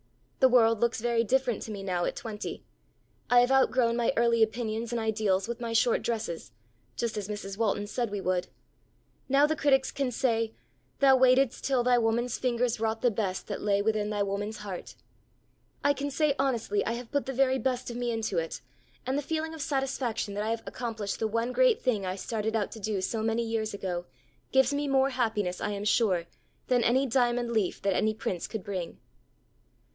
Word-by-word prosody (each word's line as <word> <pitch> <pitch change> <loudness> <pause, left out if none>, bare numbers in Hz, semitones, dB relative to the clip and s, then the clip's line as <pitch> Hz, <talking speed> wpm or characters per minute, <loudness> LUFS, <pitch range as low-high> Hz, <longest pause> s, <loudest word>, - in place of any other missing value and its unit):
The 260 - +6
world 230 -3 +4
looks 235 0 +1
very 235 0 +1
different 250 -1 +1
to 220 - -6
me 200 -2 -6
now 180 -2 -1
at - - -2
twenty. 215 -3 -6 0.7
I 245 0 +7
have 245 +2 +2
outgrown 255 -3 +3
my 235 -1 +2
early 235 0 +3
opinions 225 +1 0
and 240 - -1
ideals 215 -3 0
with 235 +1 -5
my 230 -1 -3
short 230 +1 +3
dresses, 215 -8 -3 0.4
just 235 -2 -2
as 205 -2 -4
Mrs. 205 -1 -6
Walton 205 -2 +1
said 235 +2 -2
we 205 0 -3
would. 185 -1 0 0.8
Now 275 +2 +5
the 315 +1 0
critics 270 -3 +2
can 275 -2 -1
say 230 -3 0 0.4
'Thou 270 -1 +6
waitedst 260 0 +4
till 260 -3 +2
thy 245 0 +4
woman's 235 +1 0
fingers 245 -2 0
wrought 225 0 -1
the 245 - +4
best 195 -3 -2
that - - -5
lay 200 -1 +1
within 215 -1 0
thy 205 -1 0
woman's 205 +2 -3
heart.' 195 -4 -7 0.9
I 285 - +4
can 285 +1 -3
say 290 +1 +2
honestly 235 -6 0
I 230 - -1
have 235 0 -7
put 285 -2 -1
the 270 - -2
very 265 0 +2
best 255 -2 -1
of - - -7
me 245 0 -1
into 220 -6 -1
it, 165 0 -4 0.5
and 265 +3 0
the - - -2
feeling 320 +2 -3
of 320 - -7
satisfaction 270 -7 -1
that 205 +1 -2
I 220 - -2
have 230 0 -2
accomplished 225 -5 -4
the 220 - +1
one 230 +3 -1
great - - +4
thing 210 -7 0
I 185 - -2
started 220 +2 -2
out 210 -3 0
to 225 - -8
do 210 -2 -2
so 220 +4 -2
many 225 +1 0
years 225 -2 -2
ago, 180 -3 -4 0.4
gives 265 +1 +4
me 290 0 -1
more 270 0 +3
happiness 215 -8 -1
I - - -1
am 205 0 -4
sure, 200 -6 +2 0.4
than 245 -2 +2
any 260 +4 +3
'diamond 240 -1 +1
leaf' 215 -5 0
that 195 -1 +2
any 215 +3 +1
prince 185 -5 -3
could 220 -4 -5
bring." 185 -4 -5
230 Hz, 200 wpm, -28 LUFS, 210-255 Hz, 0.9 s, I